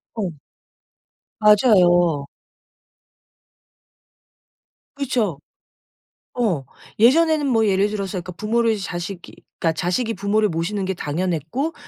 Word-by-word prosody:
어. 220 - -3 1.2
맞아요. 175 - +4 2.7
그렇죠. 240 - -1 1.0
어 205 - 0 0.3
예전에는 310 +6 +4
뭐 225 -4 +2
예를 200 +1 +2
들어서 200 -2 -4
그러니까 180 -1 -5
부모를 225 +4 0
자식이 180 -1 -6 0.2
그러니까 165 - +1
자식이 220 +6 -1
부모를 205 +2 +1
모시는 175 +5 -2
게 190 0 -2
당연했고 175 - -2
200 Hz, 230 characters per minute, -21 LUFS, 175-225 Hz, 2.7 s, 맞아요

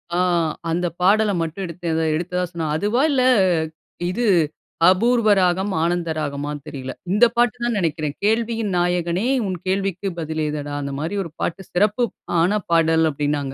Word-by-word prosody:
ஆ. - - +1 0.5
அந்த 175 +2 0
பாடல 210 +3 +4
மட்டும் 165 +4 -4
எடுத்த 170 +1 -11
எதோ 160 0 +1
எடுத்ததாக 180 +2 -2
சொன்னாங்க. 160 -3 -2
அதுவா 215 +7 +1
இல்ல, 260 -3 +2 0.9
இது 240 +7 -1 0.6
அபூர்வ 230 +4 +3
ராகம், 185 +2 +1
ஆனந்த 170 0 0
ராகமான்னு 145 0 -4
தெரியல. 135 -3 -6 0.2
இந்த 210 +5 +6
பாட்டு 240 -1 +3
தான் 240 -1 0
நெனைக்கிறேன். 155 -5 -1
கேள்வியின் 225 -1 0
நாயகனே, 175 +3 0 0.2
உன் 185 -1 -3
கேள்விக்கு 195 0 -1
பதில் 160 -1 -3
ஏதடா? 145 -1 -4
அந்த 140 0 -4
மாரி 160 +7 -3
1 165 - -9
பாட்டு 175 - -2
சிறப்பு 210 +6 +2 0.4
ஆன 200 +5 +2
பாடல் 160 -1 +4
அப்பிடின்னாங்க. 145 -1 -2
175 Hz, 150 wpm, -21 LUFS, 160-205 Hz, 0.9 s, இந்த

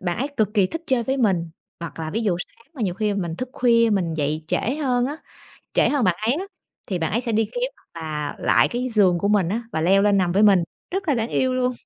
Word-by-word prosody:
bạn 180 +3 -2
ấy 275 +3 -1
cực 215 -1 0
kỳ 195 -3 +4
thích 330 - -6
chơi 255 -3 +2
với 265 +4 -1
mình, 185 -9 +1 0.3
hoặc 170 -1 -7
là 160 -1 -4
ví 225 - -2
dụ 195 -6 +1
sáng 230 +6 -9
mà 245 - -5
nhiều 180 -3 0
khi 210 0 -1
mình 170 -4 -3
thức 255 - -4
khuya 230 -2 +3
mình 175 -5 0
dậy 155 +1 -2
trễ 255 +7 0
hơn 250 -4 +1
á, 290 +3 -4 0.6
trễ - - +4
hơn 280 -6 +1
bạn 180 -2 +2
ấy 245 - +3
á, 365 +5 -3 0.4
thì 185 -3 -1
bạn 165 +2 -2
ấy 235 - +1
sẽ 235 -2 -3
đi 220 +1 +2
kiếm - - -3
hoặc 165 - -13
là 150 -2 -4
lại - - +3
cái 250 +2 -2
giường 195 -6 +3
của 200 - 0
mình 200 -5 +3
á 225 +5 -2
và 160 - -1
leo 195 +4 +4
lên 205 -1 +4
nằm 175 -2 +1
với 200 +3 +3
mình, 195 -4 +6 0.3
rất 380 -2 -3
là 285 - +4
đáng 230 0 -1
yêu 260 -1 +1
luôn. 255 0 +1
210 Hz, 275 wpm, -23 LUFS, 175-250 Hz, 0.6 s, mình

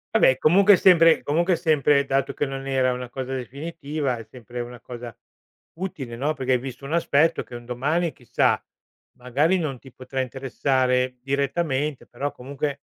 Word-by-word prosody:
Vabbè 130 - +5
comunque 190 +8 +6
è - - +8
sempre 165 -3 +6
comunque 170 +5 +2
è - - +3
sempre 150 -4 +3
dato 135 0 0
che - - -1
non 135 -1 -5
era 130 -2 +2
una 125 0 -6
cosa 130 +1 -5
definitiva, 140 +1 -4
è 115 - -8
sempre 120 +1 -8
una 120 0 -8
cosa 120 -2 -9 0.6
utile, 140 -11 -5
no, 145 +6 0
perché 130 -3 0
hai - - +4
visto 130 +1 -8
un 145 - -4
aspetto, 165 -1 +2
che 120 - -11
un 120 0 -9
domani, 150 +8 -1
chissà, 125 - 0 0.5
magari, 145 +9 +1
non 150 -6 -3
ti 135 - -15
potrà 130 +1 -4
interessare 130 -1 0
direttamente, 140 +1 -1
però 140 +4 -4
comunque, 140 +2 -5
135 Hz, 170 wpm, -24 LUFS, 125-155 Hz, 0.6 s, è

